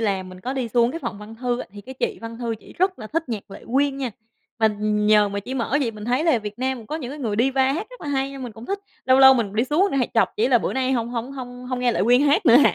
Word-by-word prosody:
làm 195 -4 -1
mình 185 0 -11
có 255 +7 -3
đi 260 -3 -2
xuống 235 +1 +3
cái 325 - -5
phòng 210 - -5
văn 210 +2 -10
thư 245 +1 -2
á - - -6
thì 205 - -9
cái 260 +6 -10
chị - - -2
văn 230 0 -7
thư 235 -2 -2
chị - - -15
rất 375 +1 +1
là 215 - -7
thích 325 +2 -2
nhạc 215 -4 -5
Lệ - - -10
Quyên 275 +1 +2
nha. 260 -3 -3 0.5
Mà 220 - +4
nhờ 210 0 +3
mà 200 0 -3
chị 250 +6 -6
mở 255 +1 0
vậy 250 -5 0
mình 210 -1 -9
thấy 250 +7 +1
là 315 -8 +4
Việt 210 +1 -7
Nam 260 0 -1
cũng 225 - -12
có 310 - -3
những 260 -5 -6
cái 295 - -7
người 225 -7 -2
diva 265 +1 +3
hát 355 +9 -3
rất - - -13
là 295 - -6
hay 270 -1 0
nên 270 -1 -7
mình 240 -3 -6
cũng 225 +2 -11
thích, 400 0 -2 0.3
lâu 260 0 +5
lâu 265 0 +9
mình 215 -5 -1
đi 225 +3 +2
xuống 320 +9 +2
hay 250 -3 +1
chọc 230 - +4
chị 225 +4 +2
là 250 -2 +5
bữa - - -2
nay 265 0 0
hổng 235 -2 0
hổng 240 +2 -4
hông 250 -2 -8
hông 255 -1 -2
nghe 245 -1 +2
Lệ - - 0
Quyên 245 +4 +5
hát 290 +3 +3
nữa 240 -1 +8
hả? 285 - +5
245 Hz, 325 wpm, -23 LUFS, 225-270 Hz, 0.5 s, lâu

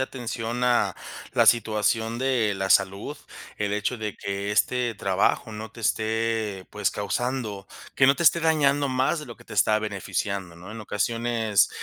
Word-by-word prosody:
atención 120 -2 -3
a 125 -1 +2 0.4
la - - +4
situación 110 0 +2
de 125 -6 +1
la 95 0 -3
salud, 100 +9 +2 0.4
el 105 -1 -1
hecho 105 +4 -1
de 105 -1 -4
que 100 +1 -3
este 120 +2 +1
trabajo 100 +2 0
no 110 0 -7
te 115 - -11
esté, 110 -2 -1
pues, 105 -2 0
causando 105 -1 -3 0.3
que 130 - +5
no 135 - +6
te 170 - -3
esté 170 +1 +6
dañando 145 -3 +2
más 130 +5 +1
de 150 - -7
lo 120 - -10
que - - -17
te - - -10
está 110 - +4
beneficiando, 100 -3 -3
¿no? 90 +4 -11
En 110 0 -7
ocasiones, 115 0 +1
110 Hz, 165 wpm, -25 LUFS, 100-125 Hz, 0.4 s, no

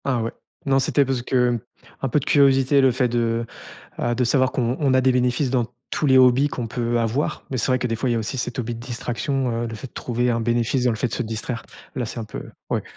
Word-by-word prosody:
Ah 125 -4 +1
ouais, 115 - -2 0.3
non 135 -1 +3
c'était 140 +1 +2
parce 130 -2 -1
que 125 -1 +1 0.4
un 135 - -1
peu 150 - +2
de 140 - -7
curiosité, 135 -1 +4
le 135 -1 +5
fait 125 +1 +1
de, 115 -1 0 0.5
heu, 120 - 0
de 125 - +1
savoir 130 +1 +2
qu'on 125 +1 -1
on 140 -4 +2
a 130 - +4
des 130 0 +4
bénéfices 125 +2 +1
dans 125 -2 +1 0.2
tous - - -1
les 130 -2 +5
hobbies 130 +2 +5
qu'on 120 -4 -4
peut 120 0 -1
avoir. 115 +5 -1
Mais 130 - -2
c'est 115 - 0
vrai 130 0 +2
que 125 - -1
des 115 - -1
fois, 120 +3 -1
il - - +2
y - - +1
a - - +1
aussi 110 +5 -4
cet 120 0 -3
hobby 120 -1 -3
de - - -9
distraction, 125 +2 -2
heu, - - -2
le 115 - -7
fait 120 - -8
de - - -27
trouver 120 0 -1
un 115 -1 +1
bénéfice 120 +2 +1
dans 125 - +3
le 110 - -3
fait 125 - 0
de 115 - -8
se 125 - -1
distraire, 115 +1 -4 0.3
là 125 -3 -1
c'est 115 - -6
un 110 - -4
peu 110 - -7 0.3
ouais. - - -1
125 Hz, 280 wpm, -23 LUFS, 115-130 Hz, 0.5 s, le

